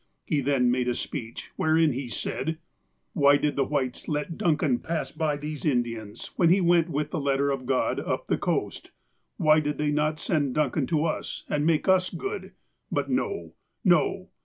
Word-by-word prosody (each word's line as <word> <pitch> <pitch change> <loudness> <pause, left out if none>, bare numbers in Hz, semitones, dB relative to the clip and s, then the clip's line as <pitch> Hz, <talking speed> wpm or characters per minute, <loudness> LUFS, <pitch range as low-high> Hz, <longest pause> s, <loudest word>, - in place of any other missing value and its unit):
He 150 -3 0
then 130 -2 +2
made 125 0 0
a 125 - +1
speech, 115 -5 -6
wherein 160 -2 +3
he 130 +1 -4
said: 160 +6 -3 0.6
"Why 140 -1 +5
did 150 0 0
the 140 - +2
Whites 130 -3 -2
let 150 +2 -2
Duncan 155 -7 +1
pass 165 -1 -3
by 155 -3 -1
these 150 0 -6
In 125 -5 +3
dians 110 -3 -8
when 170 -3 +4
he 185 +3 +5
went 175 -2 +3
with 150 0 -2
the 175 - -1
letter 140 0 +1
of 130 -2 -4
God 130 -1 +1
up - - -2
the - - 0
coast? - - -2 0.5
Why 155 0 +5
did 150 -1 -2
they 150 -1 0
not 150 +1 0
send 145 -7 0
Duncan 150 -2 +1
to 155 -1 +1
us, 160 - -3
and 150 +1 +1
make 165 +1 +2
us 185 -1 +4
good? 400 +2 -5 0.4
But - - -1
no! 400 -3 -2 0.3
no - - +2
150 Hz, 185 wpm, -26 LUFS, 135-160 Hz, 0.6 s, Why